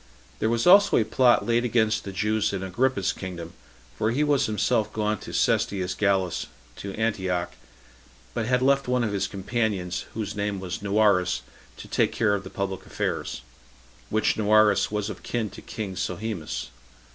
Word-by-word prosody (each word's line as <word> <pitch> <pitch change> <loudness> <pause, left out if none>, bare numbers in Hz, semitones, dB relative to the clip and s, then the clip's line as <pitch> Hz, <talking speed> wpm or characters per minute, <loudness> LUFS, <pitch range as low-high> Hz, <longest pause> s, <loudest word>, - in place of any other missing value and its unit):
There 110 - +1
was 115 0 +1
also 200 +3 +7
a 110 - +3
plot 120 +2 +3
laid 120 0 +2
against 110 -2 +1
the 100 - -5
Jews 105 +2 0
in 95 -1 -3
Agrippa's 100 0 0
kingdom; 85 -3 -7 0.4
for 110 - 0
he 130 +6 +1
was 145 -2 +2
himself 110 0 +1
gone 105 -1 -1
to - - -9
Cestius 95 -2 +1
Gallus, 95 -3 0 0.3
to 100 -1 -6
Antioch, 95 -6 -1 0.8
but 115 -2 -2
had 125 0 +2
left 140 0 +3
one 125 -1 +1
of 110 -3 -1
his 100 0 0
companions, 100 -3 -2
whose 105 -2 -3
name 100 -1 -2
was 95 0 -5
Noarus, 100 - +2 0.3
to - - -10
take - - +1
care 105 -3 +2
of 100 -1 -1
the 95 - -8
public 95 -1 -4
affairs; - - -3 0.7
which 110 +1 +1
Noarus 110 -1 +4
was 105 -1 -2
of - - -10
kin 110 -5 -3
to - - -11
king 100 -4 -6
Sohemus. 90 - -4
105 Hz, 170 wpm, -25 LUFS, 95-115 Hz, 0.8 s, also